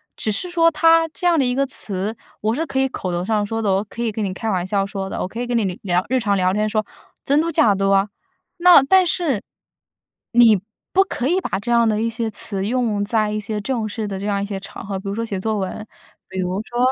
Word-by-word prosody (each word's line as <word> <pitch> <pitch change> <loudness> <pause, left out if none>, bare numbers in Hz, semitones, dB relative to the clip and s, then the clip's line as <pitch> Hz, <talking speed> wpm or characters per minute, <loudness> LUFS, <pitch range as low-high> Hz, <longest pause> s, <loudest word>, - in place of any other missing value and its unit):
只 215 - -2
是 350 - -3
说 330 -1 +4
它 330 +1 +4
这 340 +3 -8
样 345 -2 +4
的 - - +3
一 250 0 0
个 275 +1 +2
词， 205 -4 -3 0.3
我 220 +1 +1
是 315 +7 -1
可 270 -2 -1
以 265 - +3
口 185 -8 -4
头 175 +1 -2
上 215 0 +1
说 225 +2 -3
的， 200 -2 +2
我 195 +1 +1
可 215 +3 -8
以 230 - 0
跟 215 +1 -3
你 195 - -1
开 190 +4 -5
玩 185 -4 0
笑 195 +1 0
说 195 -1 -5
的， - - -4
我 - - -2
可 230 +5 -6
以 245 - -3
跟 240 -1 0
你 225 - +1 0.2
聊 180 -3 +1
聊 - - -16
日 260 +2 +1
常 205 -4 +1
聊 185 0 +2
天 210 +1 0
说 215 0 0 0.4
“真 285 +2 +3
嘟 335 - -1
假 305 -10 +4
嘟” 195 0 0
啊。 195 +1 +3 0.5
那 350 -5 +7
但 375 +7 +5
是， 335 -5 +1
你 - - -9 1.5
不 385 - +5
可 305 -9 -3
以 360 +4 +2
把 280 - -2
这 240 +4 -3
样 235 -1 +4
的 215 0 0
一 230 - 0
些 230 -1 -3
词 200 -2 -3
用 225 -3 0
在 215 0 +1
一 215 0 -2
些 210 +1 -4
正 230 -1 -2
式 215 +1 -4
的 195 -2 -4
这 200 - -4
样 200 -1 0
一 - - -2
些 200 -1 -5
场 195 - -9
合， 195 -1 -3
比 195 +1 -7
如 200 - -2
说 230 +2 -2
写 200 -4 -4
作 220 +2 -1
文。 195 +2 -4 0.4
比 190 0 -4
如 185 +2 -2
说， 240 - -6
215 Hz, 290 characters per minute, -21 LUFS, 200-260 Hz, 1.5 s, 那